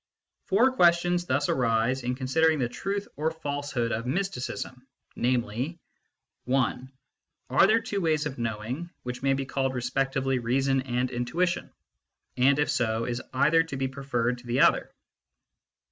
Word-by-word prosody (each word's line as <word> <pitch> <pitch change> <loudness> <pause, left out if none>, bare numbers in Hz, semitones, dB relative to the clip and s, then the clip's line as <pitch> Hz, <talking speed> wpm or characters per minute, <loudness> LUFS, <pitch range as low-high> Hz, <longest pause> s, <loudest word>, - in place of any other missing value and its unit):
Four 235 +7 +4
questions 175 -4 +3
thus 140 +2 +1
arise 120 +1 +1
in 125 +1 -2
considering 155 +5 +2
the 125 -4 0
truth 200 +10 -3
or 155 +2 +1
falsehood 145 -6 -3
of 115 +2 -2
mysticism, 130 -5 -3 0.3
namely: 125 +5 -1 0.7
I. 130 -2 +2 0.7
Are - - +6
there 225 - +4
two 210 -4 -3
ways 155 -3 +1
of 140 -4 -5
knowing, 120 +8 -3
which 125 0 -5
may 135 0 +2
be 135 0 -3
called 135 -1 -1
respectively 135 +1 0
reason 135 +3 +1
and 125 0 -1
intuition? 160 +9 -1 0.6
And 135 +2 +4
if 145 0 +1
so, 115 -5 0
is 120 +1 -3
either 155 +5 +4
to 165 -4 -5
be 135 0 0
preferred 125 -3 -2
to 120 - -15
the 120 +2 +2
other - - +3
135 Hz, 145 wpm, -27 LUFS, 125-160 Hz, 0.7 s, Are